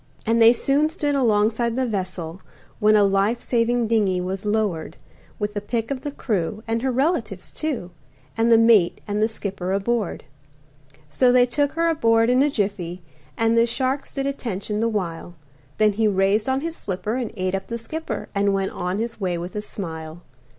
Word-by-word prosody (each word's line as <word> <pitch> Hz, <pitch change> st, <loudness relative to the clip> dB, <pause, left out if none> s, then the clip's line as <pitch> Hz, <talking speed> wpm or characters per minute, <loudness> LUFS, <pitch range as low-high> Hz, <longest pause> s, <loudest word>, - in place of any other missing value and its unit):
And 230 Hz, +1 st, +2 dB
they 225 Hz, 0 st, +9 dB
soon 275 Hz, +5 st, +2 dB
stood 300 Hz, -3 st, -1 dB
alongside 230 Hz, -2 st, +2 dB
the 260 Hz, 0 st, +1 dB
vessel, 185 Hz, -5 st, -4 dB, 0.4 s
When 215 Hz, +1 st, +5 dB
a 210 Hz, -, +5 dB
life 200 Hz, +4 st, +2 dB
saving 240 Hz, 0 st, +1 dB
dingey 210 Hz, -5 st, +2 dB
was 190 Hz, +3 st, -3 dB
lowered 205 Hz, -7 st, -1 dB, 0.4 s
With 210 Hz, -1 st, -3 dB
the 205 Hz, -, -3 dB
pick 225 Hz, +3 st, -3 dB
of 265 Hz, -2 st, -3 dB
the 290 Hz, -, -4 dB
crew, 215 Hz, -6 st, -2 dB
and 225 Hz, 0 st, 0 dB
her 260 Hz, +1 st, 0 dB
relatives, 255 Hz, -, -1 dB
too, 255 Hz, -, -3 dB, 0.4 s
And 230 Hz, +1 st, +2 dB
the 230 Hz, -, +8 dB
mate 225 Hz, -6 st, +4 dB
and 205 Hz, 0 st, -1 dB
the 220 Hz, -, +4 dB
skipper 195 Hz, -4 st, -4 dB
aboard. 200 Hz, +1 st, -1 dB, 0.8 s
So 245 Hz, -, +3 dB
they 250 Hz, 0 st, +5 dB
took 285 Hz, +3 st, 0 dB
her 335 Hz, +1 st, +1 dB
aboard 230 Hz, -7 st, +3 dB
in 250 Hz, +1 st, +4 dB
a 290 Hz, -, +4 dB
jiffy, 195 Hz, -7 st, -3 dB, 0.3 s
And 225 Hz, 0 st, +2 dB
the 230 Hz, 0 st, +4 dB
shark 260 Hz, +3 st, -1 dB
stood 275 Hz, -1 st, -4 dB
attention 215 Hz, -7 st, -3 dB
the 230 Hz, +1 st, +1 dB
while, 175 Hz, -4 st, -4 dB, 0.4 s
Then 215 Hz, -1 st, +4 dB
he 220 Hz, +2 st, +2 dB
raised 200 Hz, +3 st, +2 dB
on 265 Hz, +1 st, +1 dB
his 330 Hz, +1 st, -4 dB
flipper 210 Hz, +5 st, -3 dB
and 245 Hz, -4 st, -2 dB
ate 185 Hz, 0 st, -1 dB
up 195 Hz, 0 st, -3 dB
the 235 Hz, -, -3 dB
skipper 235 Hz, -1 st, -5 dB
And 200 Hz, -1 st, +2 dB
went 195 Hz, 0 st, -1 dB
on 180 Hz, +2 st, -3 dB
his 230 Hz, +1 st, -4 dB
way 180 Hz, -2 st, 0 dB
with 175 Hz, +3 st, -6 dB
a 210 Hz, -, -2 dB
smile. 165 Hz, -5 st, -7 dB
220 Hz, 190 wpm, -23 LUFS, 195-245 Hz, 0.8 s, they